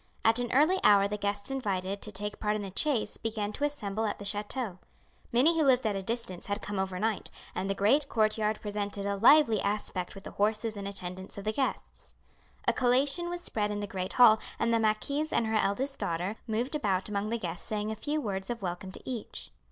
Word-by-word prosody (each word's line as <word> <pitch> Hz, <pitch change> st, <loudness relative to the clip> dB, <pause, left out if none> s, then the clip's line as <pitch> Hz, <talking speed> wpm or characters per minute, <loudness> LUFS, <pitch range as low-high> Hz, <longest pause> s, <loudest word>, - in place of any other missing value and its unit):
At 225 Hz, +2 st, +5 dB
an 245 Hz, -1 st, -2 dB
early 310 Hz, +8 st, +4 dB
hour 200 Hz, -1 st, +6 dB
the 210 Hz, -, -3 dB
guests 205 Hz, +3 st, -2 dB
invited 200 Hz, -6 st, -2 dB
to 210 Hz, -, -1 dB
take 205 Hz, +1 st, -3 dB
part 210 Hz, 0 st, 0 dB
in 210 Hz, -, -3 dB
the 195 Hz, -, -6 dB
chase 265 Hz, +1 st, 0 dB
began 215 Hz, -2 st, -3 dB
to 290 Hz, -, 0 dB
assemble 220 Hz, -7 st, -2 dB
at 205 Hz, -, -2 dB
the 205 Hz, -, -8 dB
chateau. 205 Hz, 0 st, -2 dB, 0.5 s
Many 275 Hz, +8 st, +5 dB
who 320 Hz, -, +3 dB
lived 260 Hz, -3 st, +4 dB
at 210 Hz, -2 st, +1 dB
a 195 Hz, -, -2 dB
distance 210 Hz, -4 st, -4 dB
had 205 Hz, +1 st, -1 dB
come 205 Hz, -2 st, -4 dB
overnight, 190 Hz, +3 st, -1 dB, 0.2 s
and 195 Hz, -, -2 dB
the 195 Hz, -, 0 dB
great 270 Hz, +9 st, +3 dB
court 215 Hz, -1 st, +2 dB
yard 215 Hz, -1 st, 0 dB
presented 205 Hz, -1 st, -3 dB
a 200 Hz, 0 st, 0 dB
lively 230 Hz, 0 st, +6 dB
aspect 200 Hz, -3 st, -2 dB
with 195 Hz, -, -10 dB
the -, -, -8 dB
horses 215 Hz, +2 st, 0 dB
and 200 Hz, -1 st, -5 dB
attendants 190 Hz, -1 st, -5 dB
of 200 Hz, -, -5 dB
the 215 Hz, -, 0 dB
guests. 265 Hz, +3 st, -3 dB, 0.5 s
A -, -, +5 dB
collation 275 Hz, +7 st, +2 dB
was 350 Hz, 0 st, -4 dB
spread 210 Hz, -10 st, -1 dB
in 205 Hz, 0 st, -2 dB
the 205 Hz, -, -2 dB
great 190 Hz, -2 st, -4 dB
hall, 225 Hz, -3 st, +7 dB, 0.2 s
and 230 Hz, -, +1 dB
the 230 Hz, -, +3 dB
marquise 280 Hz, +8 st, 0 dB
and 230 Hz, -, +2 dB
her 220 Hz, -, -2 dB
eldest 260 Hz, +8 st, 0 dB
daughter 175 Hz, +5 st, -1 dB
moved 235 Hz, +5 st, -1 dB
about 195 Hz, -10 st, 0 dB
among 210 Hz, 0 st, -2 dB
the 235 Hz, -, 0 dB
guests 175 Hz, -5 st, -5 dB
saying 215 Hz, 0 st, -2 dB
a -, -, -3 dB
few 295 Hz, +8 st, -2 dB
words 195 Hz, -6 st, -3 dB
of 235 Hz, -4 st, -4 dB
welcome 180 Hz, +1 st, -4 dB
to -, -, -10 dB
each. 245 Hz, -5 st, -6 dB
210 Hz, 220 wpm, -30 LUFS, 200-240 Hz, 0.5 s, hall